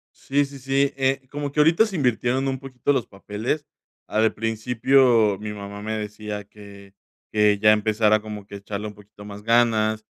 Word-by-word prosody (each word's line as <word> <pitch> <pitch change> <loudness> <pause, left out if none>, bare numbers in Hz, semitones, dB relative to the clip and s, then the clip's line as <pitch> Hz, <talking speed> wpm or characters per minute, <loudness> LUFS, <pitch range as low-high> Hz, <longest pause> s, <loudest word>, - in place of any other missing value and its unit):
Sí, 145 +1 0
sí, 140 0 -10
sí, 135 +1 +1
eh, 135 0 0
como 145 -1 -4
que 150 - +1
ahorita 165 +8 +5
se 200 - -5
invirtieron 130 -1 +1
un 130 - -2
poquito 135 +1 -2
los 130 -5 -1
papeles. 105 +9 -4 0.4
Al 110 +1 +2
principio, 115 0 +2
mi 105 0 -5
mamá 100 0 -8
me 110 +1 -3
decía 105 0 -6
que 100 -1 -15 0.4
que 105 -1 +3
ya 105 +1 +6
empezara 110 0 +2
como 105 -2 -8
que 100 - -11
a - - -6
echarle 100 +1 -5
un 105 - -7
poquito 105 0 -16
más 105 0 -9
ganas, 110 -2 +2
110 Hz, 185 wpm, -23 LUFS, 105-135 Hz, 0.4 s, ya